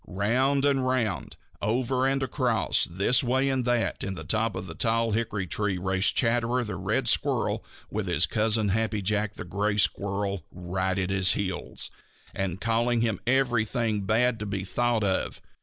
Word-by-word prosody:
Round 130 +9 +1
and 140 -2 +2
round, 125 -7 -1 0.2
over 125 +4 +1
and 135 0 0
across, 125 -4 +1
this 100 +9 +2
way 130 +2 +1
and 130 -2 0
that 120 -2 0
way, - - -3
in 95 - -3
the - - -6
top 110 0 0
of 95 0 -5
the 85 - -7
tall 115 +4 +1
hickory 105 -3 -1
tree 100 +2 -1
raced 95 +2 +2
Chatterer 120 +1 +1
the 105 -4 -5
Red 95 +1 -1
Squirrel - - +1 0.3
with 105 -2 -3
his 85 -2 +3
cousin, 110 +3 +1
Happy 110 0 0
Jack 105 +1 0
the - - -7
Gray 100 +4 -1
Squirrel, 100 -1 0
right 95 +2 -2
at 95 0 -1
his 95 -3 +3
heels, 95 -3 -3 0.4
and 95 -2 -3
calling 115 +1 +1
him 110 -5 0
everything 120 -4 +1
bad 115 +2 +2
to 105 - -4
be 100 -1 -3
thought 120 +3 0
of. 95 -2 -1
110 Hz, 175 wpm, -27 LUFS, 95-120 Hz, 0.4 s, his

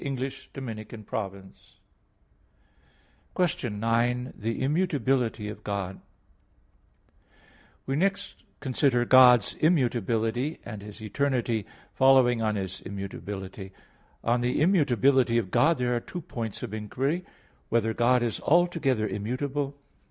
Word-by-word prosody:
_______________________ 110 -7 -6 1.6
QUESTION 150 - -1
9 120 +3 0
THE 115 +2 -3
IMMUTABILITY 135 - 0
OF 105 0 -8
GOD 100 -3 -2
(In 95 - -10
Two - - -18
Articles) - - -37 0.5
We 135 - -1
next 195 +4 -1 0.2
consider 130 -2 +1
God's 125 -3 +7
immutability, 125 -3 +1
and 105 -1 -7
His 105 +1 -10
eternity 120 -2 -1 0.3
following 130 -3 +5
on 110 -1 0
His 95 -2 -4
immutability. 95 0 -7 0.5
On 120 +1 +1
the 125 +1 0
immutability 135 - +3
of 100 -6 -1
God 165 +1 +4
there 125 -1 0
are - - +1
two 175 +8 -7
points 115 - -6
of 110 -4 -5
inquiry: 130 - -1
(1) 180 - -17 0.4
Whether 115 -1 +1
God 120 +2 +3
is 115 -2 -2
altogether 155 -9 +2
immutable? 135 +7 -3
120 Hz, 115 wpm, -27 LUFS, 110-135 Hz, 1.6 s, God's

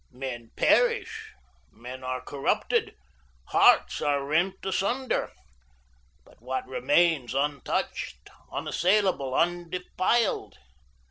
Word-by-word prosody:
Men 125 -3 -7
perish, 450 -2 +2 0.4
men 125 +2 -10
are 130 0 -3
corrupted, 140 +2 -1 0.5
hearts - - +4
are 140 -1 0
rent 170 +6 +1
asunder, 235 +7 -1 0.9
but - - -22
what 130 +2 -3
remains 145 -1 +2
untouched, 135 - -2 0.2
unassailable, 180 -8 +1
undefiled? 180 +6 0
150 Hz, 80 wpm, -27 LUFS, 130-190 Hz, 0.9 s, hearts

